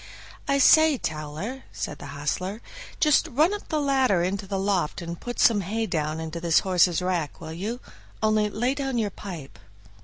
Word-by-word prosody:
"I 280 -1 +2
say, 315 +1 +6
Towler," 155 - -5
said - - -5
the - - -8
hostler, 150 +9 -3 0.4
"just 305 +1 +4
run 310 +7 +2
up 415 - -6
the 310 - 0
ladder 265 -10 +2
into 195 +2 -2
the 195 - -2
loft 190 -5 0
and 170 -1 -6
put 245 0 -5
some 215 -3 +5
hay 220 +5 -2
down 155 -4 -2
into 160 +1 -5
this 165 -1 +3
horse's 180 -2 +3
rack, 175 -5 -2
will 160 -1 -7
you? 210 +8 -4 0.4
only 215 -1 +3
lay 245 +5 0
down 270 -3 -2
your 210 -3 0
pipe." 165 - -9
195 Hz, 180 wpm, -25 LUFS, 170-250 Hz, 0.4 s, say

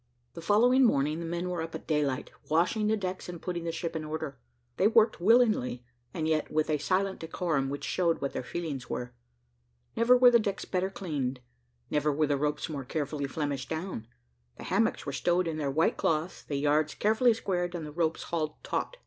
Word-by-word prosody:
The 170 - -8
following 240 +9 +4
morning 150 - +2
the 170 - -4
men 170 +2 -2
were 180 -2 -2
up 165 0 -5
at - - -7
daylight, 145 -4 0 0.2
washing 180 +7 +2
the 220 +1 +2
decks 185 -2 -4
and 175 -1 -6
putting 175 -1 -4
the 165 - -1
ship 165 0 -4
in 160 - -2
order; 155 -3 -5 0.4
they 195 - +4
worked 220 -4 +4
willingly, 210 - +3 0.3
and 155 +3 -2
yet 155 -1 +1
with 155 0 0
a 150 - +1
silent 190 +4 0
decorum 160 -4 -1
which 140 +1 -5
showed 170 -3 +1
what 140 - -3
their - - -2
feelings 140 -2 -5
were. 125 0 -4 0.8
Never 245 +2 +5
were 250 0 +7
the 235 - +6
decks 205 -3 -2
better 185 0 -1
cleaned, 145 -10 -3 0.5
never 150 0 +2
were 155 +2 +2
the 145 - +1
ropes 150 +1 -1
more 145 -4 -5
carefully 145 +1 -3
flemished 140 -2 -3
down; 160 - -4 0.5
the - - -9
hammocks - - +1
were - - -4
stowed 175 0 +1
in 160 -1 -2
their 145 -3 -1
white 160 +4 +2
cloths, 160 +3 0
the 145 - -5
yards 150 +2 +1
carefully 220 +3 +3
squared, 175 -5 -2
and 165 -3 -4
the 150 - -7
ropes 165 +1 -1
hauled 155 -3 -2
taut. - - -3
165 Hz, 200 wpm, -29 LUFS, 150-185 Hz, 0.8 s, were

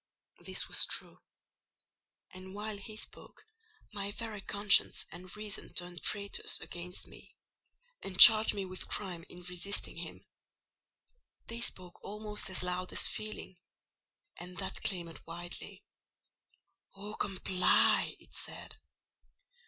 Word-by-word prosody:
This - - -1
was - - +4
true: - - -1 1.1
and 185 +1 -10
while 210 +1 -4
he 215 +2 -9
spoke - - -8 0.5
my 200 -1 -3
very 215 -1 -6
conscience 200 +1 +4
and 180 +3 -9
reason 210 -1 -6
turned 175 -1 -2
traitors 200 -1 0
against 175 +1 -6
me, - - -16 0.7
and 185 -2 -7
charged 220 -1 +11
me 200 -1 -3
with 185 0 -5
crime 180 -5 -4
in 180 0 -11
resisting 180 +3 -2
him. - - -8 1.2
They 230 +1 -7
spoke 180 -6 -4
almost 210 0 -4
as 185 - 0
loud 180 0 -2
as - - +2
Feeling: 215 -3 -7 0.8
and 180 +1 -9
that 190 - -4
clamoured 170 -3 -3
wildly. 175 +1 -9 1.1
"Oh, 205 +2 -7
comply!" 185 -3 +2
it - - -21
said. - - -8
190 Hz, 120 wpm, -32 LUFS, 180-210 Hz, 1.2 s, charged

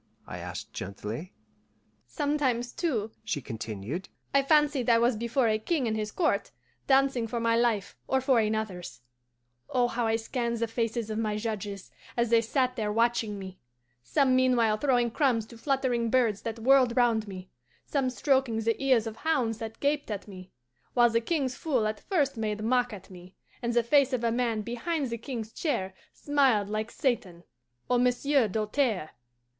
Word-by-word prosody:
I - - -7
asked - - -7
gently. 105 - -6 0.8
"Sometimes, 275 -5 0
too," 230 - -1
she 220 -9 -2
continued, 115 - -6 0.2
"I 275 - +5
fancied 290 -3 +3
I 230 - +6
was 235 +1 +3
before 235 +3 +1
a 215 -1 +2
king 270 +2 0
and 220 - 0
his 215 -1 -3
court, 335 - 0 0.4
dancing 270 -3 +3
for 235 +1 -3
my 230 0 +2
life 230 -4 +1
or 265 - +2
for 260 -2 +3
another's. 215 - -2 0.7
Oh, 245 -1 +2
how 240 -1 -1
I 225 - +2
scanned 235 +1 -2
the 230 - 0
faces 225 -1 -2
of 215 - -2
my 215 -2 -1
judges, 210 -3 -5 0.3
as 235 -1 +1
they 230 -1 +6
sat 255 +2 0
there 210 -2 -1
watching 230 -1 +1
me; 190 -1 -9 0.4
some 255 - +2
meanwhile 245 -4 +3
throwing 245 -1 +1
crumbs 235 -4 +1
to 235 - -13
fluttering 255 -4 0
birds 230 -5 +2
that 225 0 -4
whirled 255 0 +4
round 230 -3 +3
me, 185 -2 -9 0.3
some 270 -3 0
stroking 260 -3 +1
the 230 +3 -1
ears 255 -5 +3
of 225 0 -6
hounds 255 -9 0
that 225 0 -7
gaped 290 -1 0
at 205 -1 -5
me, 185 -2 -10 0.5
while 240 -1 +5
the 230 0 +2
king's 270 -1 -1
fool 260 -9 0
at 215 0 -2
first 300 - 0
made 215 -1 -2
mock 245 +1 +2
at 195 -2 -10
me, 180 0 -13 0.3
and 235 -1 -1
the 240 - +4
face 275 +2 +3
of 245 -2 -1
a 230 - +2
man 230 -2 0
behind 260 +4 -2
the 235 - -2
king's 230 -3 -6
chair 190 - -2 0.2
smiled 265 -9 +2
like 215 +1 -2
Satan 190 -10 -2 0.4
or 245 - +2
Monsieur 250 +1 +2
Doltaire! 215 - -1
235 Hz, 175 wpm, -28 LUFS, 215-260 Hz, 0.8 s, I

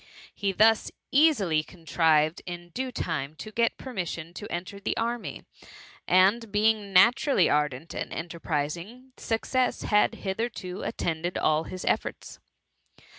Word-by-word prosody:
He 200 -2 -1
thus 220 +3 +4 0.2
easily 245 - +4
contrived 160 -1 +1
in 175 0 -7
due 260 +6 -3
time 145 - -3
to 215 - -8
get 230 +1 +1
permission 175 -9 -5
to 205 +3 -8
enter 185 +3 -5
the - - -2
army, 235 0 -3 0.6
and 200 +5 +4
being 210 -1 +2
natu 210 +10 +5
rally 195 - +4
ardent 150 0 0
and - - -4
enterprising, 170 - -4
success 250 +3 -1
had 210 -1 +3
hitherto 190 -2 -4
attended 170 +1 -2
all 155 +1 +2
his 185 - -7
efibrts. - - -2
185 Hz, 125 wpm, -27 LUFS, 165-225 Hz, 0.6 s, natu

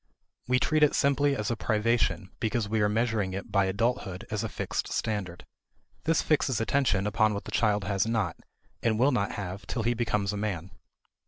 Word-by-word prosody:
We 125 +1 +3
treat 155 +4 +1
it 150 - +5
simply 140 0 +3
as 105 -2 -2
a - - 0
privation 110 -3 0
because 115 -2 0
we 110 +1 0
are 105 - +3
measuring 110 -3 0
it 95 - -6
by 100 -1 +3
adulthood 100 -1 -1
as 105 - -1
a - - -2
fixed - - -3
standard. 100 -5 -3 0.6
This 165 0 +2
fixes 145 -5 +1
attention 115 -5 +1
upon 110 0 +2
what 100 - -4
the - - -7
child 105 -3 +2
has 100 +2 0
not, 115 -1 0 0.5
and 110 -2 +1
will 130 +5 +4
not 105 -6 0
have 100 -1 -6
till 115 - -2
he 120 +2 +2
becomes 105 -4 0
a - - -3
man. 95 -4 -3
110 Hz, 190 wpm, -28 LUFS, 100-120 Hz, 0.6 s, it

